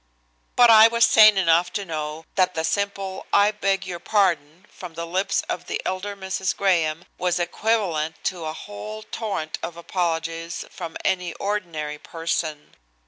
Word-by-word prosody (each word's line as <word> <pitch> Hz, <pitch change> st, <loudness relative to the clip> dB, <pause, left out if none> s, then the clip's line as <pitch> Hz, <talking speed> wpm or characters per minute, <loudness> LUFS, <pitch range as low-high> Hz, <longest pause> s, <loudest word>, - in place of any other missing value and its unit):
But 240 Hz, -1 st, +7 dB
I 220 Hz, 0 st, +9 dB
was 235 Hz, +1 st, +4 dB
sane 215 Hz, -2 st, +7 dB
enough 175 Hz, -1 st, +3 dB
to 200 Hz, -2 st, -2 dB
know 155 Hz, -1 st, -5 dB
that 185 Hz, -1 st, +2 dB
the 160 Hz, -, -1 dB
simple 195 Hz, +1 st, -2 dB
"I 205 Hz, +1 st, +5 dB
beg 195 Hz, -2 st, -1 dB
your 175 Hz, -2 st, -5 dB
pardon" 175 Hz, -4 st, 0 dB
from 175 Hz, -3 st, -11 dB
the 170 Hz, +1 st, -4 dB
lips 185 Hz, +4 st, 0 dB
of -, -, -4 dB
the -, -, -2 dB
elder 190 Hz, +2 st, -3 dB
Mrs. 190 Hz, -1 st, -2 dB
Graham 170 Hz, -4 st, +1 dB
was 180 Hz, -1 st, +1 dB
equivalent 175 Hz, -3 st, 0 dB
to 175 Hz, -4 st, -2 dB
a 155 Hz, -, -3 dB
whole 105 Hz, -4 st, -8 dB
torrent 200 Hz, -9 st, -4 dB
of 170 Hz, -, -6 dB
apologies 165 Hz, -1 st, -3 dB
from 170 Hz, -3 st, -7 dB
any 180 Hz, -3 st, 0 dB
ordinary 165 Hz, -8 st, -3 dB
person. 165 Hz, -2 st, -4 dB
180 Hz, 155 wpm, -23 LUFS, 160-195 Hz, -, I